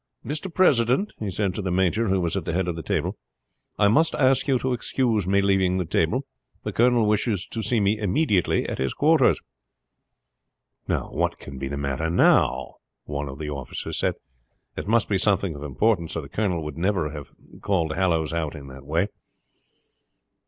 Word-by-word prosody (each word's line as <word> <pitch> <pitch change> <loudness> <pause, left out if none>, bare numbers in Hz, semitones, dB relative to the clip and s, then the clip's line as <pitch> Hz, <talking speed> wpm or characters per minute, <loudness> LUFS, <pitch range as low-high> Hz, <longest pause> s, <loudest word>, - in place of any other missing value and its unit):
"Mr. 155 +6 -3
President," 145 - +3
he 105 - -3
said 95 0 -1
to 105 - -4
the 95 - -2
major 95 +5 +1
who 95 0 +2
was 85 -2 -1
at - - -1
the - - -3
head 90 +1 0
of 85 - -2
the 80 - -5
table, - - -2 0.6
"I 100 - +4
must 150 +10 +3
ask 135 -1 +3
you 135 -2 +3
to 130 +1 -1
excuse 115 -5 0
me 100 +1 +3
leaving 95 -2 +2
the 90 - -1
table. 85 - 0 0.4
The - - -4
colonel 120 -2 +3
wishes 105 -2 0
to 115 - -5
see 115 +1 +1
me 105 +1 +1
immediately 105 - +1
at - - -4
his 65 -1 -1
quarters." - - +4 1.5
"What - - -1
can 70 -1 -9
be 70 - -3
the 70 +1 -4
matter 70 +3 -2
now?" 65 -6 +3 0.3
one 70 -1 -4
of 65 - -8
the 75 -1 -5
officers 70 -3 -5
said. - - 0 0.6
"It - - -5
must 115 +1 +3
be 100 -2 +1
something 100 -3 +1
of 70 - -9
importance 85 - 0
or 80 - -2
the 70 - -11
colonel 90 -7 -1
would 75 0 -6
never 90 -5 0
have 75 -2 -8 0.3
called 85 -6 0
Hallowes 80 -3 +1
out 80 -2 -2
in 70 -2 -9
that 70 +1 -12
way." 85 +6 +1
95 Hz, 190 wpm, -24 LUFS, 80-110 Hz, 1.5 s, I